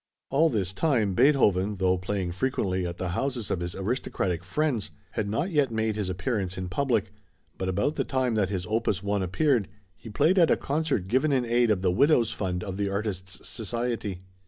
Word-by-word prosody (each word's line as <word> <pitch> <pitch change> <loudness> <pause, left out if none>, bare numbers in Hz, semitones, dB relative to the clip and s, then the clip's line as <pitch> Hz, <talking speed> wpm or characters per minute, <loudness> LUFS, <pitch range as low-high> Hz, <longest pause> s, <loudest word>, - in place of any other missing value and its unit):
All 155 +4 +4
this 95 - -1
time, 110 -4 +1
Beethoven, 105 -6 +3
though 95 -1 +2
playing 90 -1 -2
frequently 95 -4 -1
at 85 0 -6
the 90 - -3
houses 125 +4 -2
of 90 - 0
his 85 0 -4
aristocratic 95 -4 -2
friends, 130 - -1 0.2
had 100 - -2
not 145 - -1
yet 145 -5 +2
made 110 -1 -1
his 105 -3 -2
appearance 95 0 -2
in 90 -1 -4
public, 115 -3 0 0.5
but 95 - -1
about 105 +11 0
the - - +2
time 130 -3 0
that 105 -4 +1
his 95 -3 -3
opus 105 -2 0
1 100 0 0
appeared, 110 - +1 0.3
he 115 - -11
played 155 - +3
at 170 - +5
a - - +4
concert 145 - -1
given 130 +8 +2
in 130 -3 +2
aid 120 0 +2
of 100 -3 +1
the 90 - +3
Widow's 120 - +3
Fund 90 -3 -2
of 95 -2 -5
the 100 -1 0
Artists' 95 -2 -4
Society. 115 -4 -3
105 Hz, 195 wpm, -27 LUFS, 95-130 Hz, 0.5 s, at